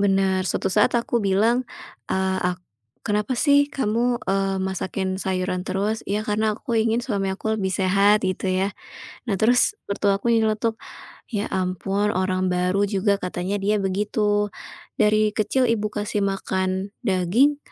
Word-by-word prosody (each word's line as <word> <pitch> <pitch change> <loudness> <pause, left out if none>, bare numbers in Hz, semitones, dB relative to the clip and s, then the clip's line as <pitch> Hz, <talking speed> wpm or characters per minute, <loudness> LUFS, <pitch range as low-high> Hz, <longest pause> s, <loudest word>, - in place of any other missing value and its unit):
Bener. 195 -1 +2
Suatu 190 - -1
saat 210 +4 +3
aku 235 0 0
bilang, 220 +5 +2 0.4
eee, 190 0 0
ak - - -8 0.5
"Kenapa 210 +4 0
sih 285 0 +4
kamu," 240 -2 0
eee, 195 0 0
"masakin 190 0 -2
sayuran 185 -1 -1
terus?" 210 +3 -1
"Ya, 210 +2 -1
karena 215 0 0
aku 235 - -4
ingin 225 +1 +1
suami 200 -6 -1
aku 220 +3 -2
lebih 190 - 0
sehat," 200 +3 +3
gitu 185 +1 -2
yah. 190 +2 0 0.6
Nah, 205 - +1
terus 245 - +3 0.2
mertua 200 0 +2
aku 235 +4 -1
ini 230 - +4
nyeletuk, 220 +1 -1 0.6
"Ya 205 0 -1
ampun 195 +2 -1
orang 185 0 0
baru 180 +2 +1
juga," 200 0 +1
katanya 180 +1 -3
dia 210 +1 +2
begitu. 205 +1 0 0.5
"Dari 215 0 +3
kecil 225 +5 +1
Ibu 215 -2 0
kasih 210 0 -2
makan 190 0 -2
daging, 215 +8 +2
200 Hz, 150 wpm, -23 LUFS, 190-215 Hz, 0.6 s, sih